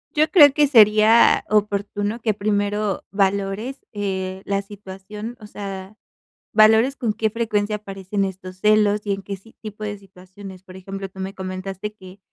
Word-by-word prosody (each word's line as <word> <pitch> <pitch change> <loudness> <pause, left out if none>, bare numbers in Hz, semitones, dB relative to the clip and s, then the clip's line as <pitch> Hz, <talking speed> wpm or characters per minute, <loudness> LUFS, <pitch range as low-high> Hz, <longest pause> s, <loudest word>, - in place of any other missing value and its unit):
Yo 310 +2 +3
creo 295 -7 +8
que 295 0 +3
sería 220 -2 +6
oportuno 205 +1 -1
que 220 -1 +1
primero 205 0 -1
valores, 200 +6 -1
eh, 190 -2 -4
la 200 0 -1
situación, 205 +3 -9
o 210 - -11
sea, 195 -1 -8 0.6
valores 220 +5 +5
con 230 -6 -1
qué 220 +1 0
frecuencia 215 -2 -1
aparecen 195 -1 -4
estos 185 -1 -7
celos 210 -1 +3
y 205 - -1
en 195 - -4
qué 200 0 -6
si 225 +4 -19
tipo 215 -1 -8
de 205 -1 -4
situaciones. 190 0 -13
Por 185 -1 -13
ejemplo, 195 +1 -7
tú 190 0 -12
me 190 +1 -5
comentaste 190 +2 -6
que 190 -2 -14
205 Hz, 160 wpm, -22 LUFS, 195-215 Hz, 0.6 s, creo